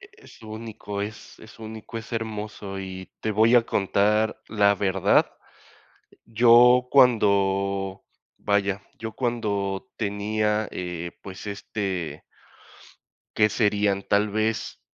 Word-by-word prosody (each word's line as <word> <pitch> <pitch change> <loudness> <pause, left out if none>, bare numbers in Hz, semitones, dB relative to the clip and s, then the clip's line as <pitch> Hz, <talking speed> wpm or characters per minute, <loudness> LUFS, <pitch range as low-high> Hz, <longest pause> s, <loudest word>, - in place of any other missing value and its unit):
es 395 - -17
único, 110 -2 -7
es 105 +1 -8
es 110 +1 -15
único, 110 +1 -8
es 115 +1 -11
hermoso, 105 -3 -5
y 95 -1 -7
te 110 - -1
voy 110 +3 +4
a 120 - +7
contar 105 +2 +1
la 100 -2 +3
verdad, 95 -2 +2 0.9
yo 120 +2 +5
cuando 100 -6 +2 0.3
vaya, 100 -1 0 0.2
yo 115 -1 -6
cuando 110 -3 -2
tenía, 105 +1 -1
eh, 85 -1 -5
pues, 95 +1 -9
este 100 -4 -4 1.2
¿qué 105 -1 +5
serían?, 100 -2 +1
tal 105 +2 +1
vez 110 +1 -2
105 Hz, 110 wpm, -25 LUFS, 100-110 Hz, 1.2 s, a